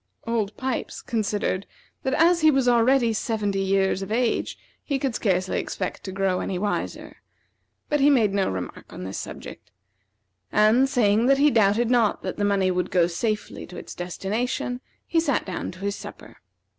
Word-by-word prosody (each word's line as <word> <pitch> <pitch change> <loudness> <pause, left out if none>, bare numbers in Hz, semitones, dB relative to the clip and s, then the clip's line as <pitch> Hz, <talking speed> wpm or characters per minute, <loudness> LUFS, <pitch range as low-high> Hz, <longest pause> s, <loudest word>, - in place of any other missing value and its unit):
Old 225 -3 -1
Pipes 260 -1 -3
considered 205 -4 -1 0.3
that 265 +1 0
as 340 +2 +4
he 310 - +6
was 270 -4 +2
already 240 0 +4
seventy 210 -3 -1
years 195 0 +1
of 195 +1 -6
age 235 +1 0 0.3
he 280 - -1
could 270 -2 -1
scarcely 185 -4 0
expect 185 - -4
to 190 - -5
grow 190 -1 0
any 190 - -2
wiser, 205 +2 -3 0.7
but 295 - +1
he 280 +1 +5
made 225 -8 +3
no 195 -1 +1
remark 90 -1 -6
on - - -8
this 95 +1 -5
subject; 105 - -9 0.8
and, 220 +6 +4
saying 225 -1 +3
that 275 0 +5
he 290 +1 +4
doubted 225 +1 +3
not 235 -4 +2
that 185 - -4
the 205 - -1
money 195 -2 +2
would 180 0 -1
go 175 -2 +3
safely 210 +5 -3
to 180 - -10
its - - -8
destination, 220 +7 -3 0.2
he 330 - +1
sat 295 -5 0
down 185 - -4
to 180 - -10
his 200 0 -2
supper. - - -11
215 Hz, 175 wpm, -24 LUFS, 190-250 Hz, 0.8 s, he